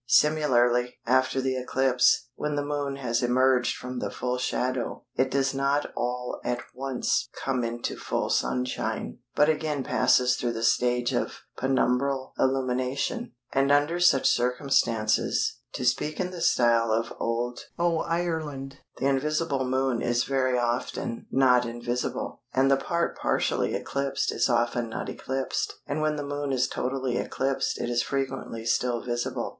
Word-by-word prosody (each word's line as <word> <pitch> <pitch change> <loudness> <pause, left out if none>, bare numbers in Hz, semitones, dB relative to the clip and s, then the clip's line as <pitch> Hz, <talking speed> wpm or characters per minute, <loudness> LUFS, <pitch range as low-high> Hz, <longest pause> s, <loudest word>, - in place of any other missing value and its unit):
Similarly, 125 -4 +3
after 130 +2 +2
the 130 0 0
eclipse, 130 -1 +2
when 150 +2 -3
the 145 0 -1
Moon 145 -1 -2
has 120 -3 -1
emerged 125 +1 +3
from 125 0 -5
the - - -2
full 125 0 -2
shadow 130 0 -2
it 130 - +2
does 135 0 +1
not 140 +2 0
all 125 0 -2
at 125 0 -1
once 135 -1 -1 0.2
come 130 -2 0
into 120 +1 -3
full - - -2
sunshine, 125 -3 -1 0.2
but 150 - +5
again 150 -3 0
passes 125 -1 +3
through 120 -1 -1
the 115 0 -4
stage 120 +1 +2
of - - -2
penumbral 130 +1 +1
illumination, 130 - 0 0.2
and 135 +1 +3
under 145 +4 +3
such 175 -7 +5
circumstances 120 -3 +1
(to 125 - -3
speak 140 +5 0
in 180 -1 -1
the 175 -2 -7
style 115 -7 +3
of 115 +1 0
Old 120 +1 -2
"Oireland") 160 -5 -1 0.2
the - - -2
invisible 140 0 +1
Moon 130 -1 0
is 120 +1 +1
very 130 -2 +1
often 120 -1 -2
not 125 -2 +4
invisible, 120 +1 -3
and 135 +1 +4
the - - +7
part 170 +5 -1
partially - - 0
eclipsed 140 0 -1
is - - +1
often 120 0 +1
not 115 - -4
eclipsed, 135 0 -3
and 150 +2 -2
when 155 0 +1
the 145 -1 -4
Moon 145 0 -3
is 130 -1 +2
totally 130 -1 -2
eclipsed 135 +1 -1
it - - -2
is 120 0 +1
frequently 135 -4 -3
still 120 +1 +1
visible. 120 -1 -2
130 Hz, 150 wpm, -27 LUFS, 125-140 Hz, 0.2 s, the